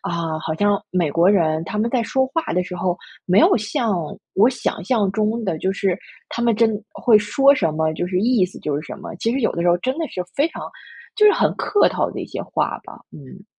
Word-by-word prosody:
啊， 165 -2 -3
好 160 0 -3
像 205 +3 +1
美 175 -5 0
国 170 +5 +3
人 160 -5 +2
他 165 - -5
们 225 +2 0
在 245 -3 +1
说 265 +3 +1
话 330 +4 -1
的 180 - +2
时 180 0 -7
候， 180 0 -1 0.3
没 185 +3 +4
有 - - +5
像 225 +2 -1 0.4
我 215 +5 +5
想 260 - -3
象 215 -7 +1
中 220 +2 -1
的， 165 -6 -2
就 190 - -1
是 195 -1 -1 0.3
他 235 - -4
们 235 -2 +2
真 230 0 +4 0.2
会 225 -4 +4
说 275 +6 +4
什 165 - 0
么， 160 0 0
就 175 +3 -3
是 180 0 -1
意 225 -4 +3
思 180 - -12
就 150 - -2
是 145 - -1
什 - - -7
么， - - -8
其 225 - -1
实 265 +2 -1
有 225 - +1
的 170 - -3
时 175 - +2
候 175 - +4
真 260 - -2
的 320 - -2
是 180 -1 -5
非 290 +4 +2
常 - - -9 0.5
就 425 - +5
是 415 - +7
很 - - +1
客 410 - +3
套 - - -1
的 - - -6
一 - - -4
些 - - -6
话 - - -2
吧。 - - -12
嗯。 150 +7 -13
200 Hz, 270 characters per minute, -21 LUFS, 175-235 Hz, 0.5 s, 是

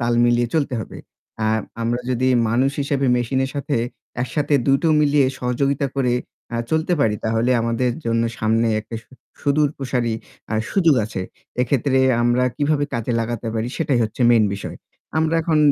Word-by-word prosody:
তাল 120 0 +1
মিলিয়ে 120 0 +2
চলতে 145 -5 +1
হবে। - - -8 0.5
আর 110 - +2 0.2
আমরা 120 +1 0
যদি 130 +1 +1 0.2
মানুষ 125 +4 +2
হিসেবে 140 -1 0
মেশিনের 130 +2 0
সাথে 140 0 -1 0.5
একসাথে 145 +3 -1
দুটো 135 +4 +3
মিলিয়ে 145 -2 +4
সহযোগিতা 135 +3 0
করে 125 -3 +2 0.4
আ - - 0
চলতে 160 +2 +1
পারি 110 -6 +3
তাহলে 115 +2 +1
আমাদের 115 +2 0 0.2
জন্য 115 0 +1 0.2
সামনে 110 +1 +2
একটা 110 +2 -10
সু - - -41 0.3
সুদূর 145 +1 +2
প্রসারি 125 -3 -1 0.4
আ - - +1 0.2
সুযোগ 170 -7 +4
আছে। 105 -3 -5 0.4
এক্ষেত্রে 130 +1 +1 0.2
আমরা 120 +1 +3
কিভাবে 145 0 +1
কাজে 115 +1 -1
লাগাতে 115 0 -3
পারি 115 +1 -1
সেটাই 145 -6 +1
হচ্ছে 110 +3 -7
মেইন 115 -3 +5
বিষয়। 100 - -7 0.4
আমরা 160 +1 +1
এখন 160 -1 +2
125 Hz, 160 wpm, -21 LUFS, 115-140 Hz, 0.5 s, মেইন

